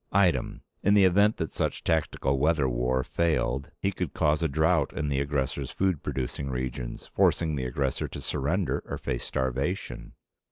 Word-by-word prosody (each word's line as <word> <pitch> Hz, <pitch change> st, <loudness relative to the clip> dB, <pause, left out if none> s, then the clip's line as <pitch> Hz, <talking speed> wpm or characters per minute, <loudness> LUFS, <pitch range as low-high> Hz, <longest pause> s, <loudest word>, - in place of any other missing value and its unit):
Item. 95 Hz, -3 st, +2 dB, 0.2 s
In 100 Hz, +1 st, +4 dB
the 100 Hz, -, +6 dB
event 100 Hz, +4 st, +4 dB
that 80 Hz, -, -3 dB
such -, -, -2 dB
tactical 70 Hz, -4 st, +1 dB
weather 75 Hz, -1 st, +3 dB
war 65 Hz, +1 st, 0 dB
failed, 70 Hz, -5 st, 0 dB
he 100 Hz, -, 0 dB
could 90 Hz, -5 st, -4 dB
cause 75 Hz, +2 st, +2 dB
a 80 Hz, -, +2 dB
drought 80 Hz, +1 st, +2 dB
in 75 Hz, -, -2 dB
the 70 Hz, -1 st, +1 dB
aggressor's 70 Hz, -1 st, -1 dB
food 95 Hz, -6 st, 0 dB
producing 70 Hz, +1 st, -3 dB
regions, 65 Hz, -1 st, -4 dB
forcing 80 Hz, -3 st, +2 dB
the 65 Hz, -2 st, -2 dB
aggressor 65 Hz, +1 st, -1 dB
to -, -, -7 dB
surrender 85 Hz, +7 st, -1 dB
or -, -, -4 dB
face -, -, -3 dB
starvation. 65 Hz, -1 st, -2 dB
70 Hz, 165 wpm, -28 LUFS, 65-85 Hz, 0.2 s, the